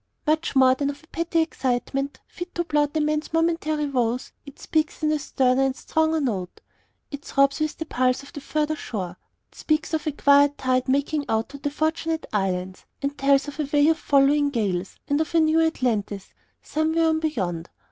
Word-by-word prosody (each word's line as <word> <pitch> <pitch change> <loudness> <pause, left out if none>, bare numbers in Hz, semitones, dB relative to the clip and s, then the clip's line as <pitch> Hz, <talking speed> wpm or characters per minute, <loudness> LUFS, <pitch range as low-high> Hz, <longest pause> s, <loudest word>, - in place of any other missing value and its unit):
Much 315 -1 0
more 260 -1 +6
than 280 +2 -1
of 285 +2 -7
a - - -20
petty 335 0 0
excitement, 275 -2 -2
fit 355 0 -9
to 345 - 0
blot 295 -2 0
a - - +2
man's 305 0 -1
momentary 325 -2 +1
woes, 250 -3 -1 0.2
it 280 - -11
speaks 310 0 -1
in 305 - +3
a 305 - +1
sterner 260 -2 +1
and 270 -1 +1
a - - -17
stronger 320 0 +1
note. 200 -10 -3 0.5
It 285 0 -7
throbs 275 +1 +2
with 310 0 -1
the 320 - -4
pulse 255 -2 0
of 280 - -14
a - - -4
further 305 +2 -1
shore. 185 - -5 0.3
It - - -22
speaks 310 +2 0
of 315 0 -1
a - - +2
quiet 285 0 +4
tide 255 0 0
making 285 +2 0
out 220 0 0
to 280 - -10
the 290 - -2
Fortunate 320 +2 -1
Islands, 185 -2 -2 0.2
and 280 +1 -1
tells 275 0 +3
of 290 +1 -8
a 295 -2 -2
way 290 +1 +4
of 325 0 +2
following 285 +1 +3
gales, 195 -8 -2
and 285 +1 +1
of 320 +1 -3
a - - +6
new 315 +1 +4
Atlantis, 225 -11 -1 0.3
somewhere 320 +2 +1
on 320 0 +2
beyond. 185 - -2
285 Hz, 200 wpm, -24 LUFS, 255-315 Hz, 0.5 s, more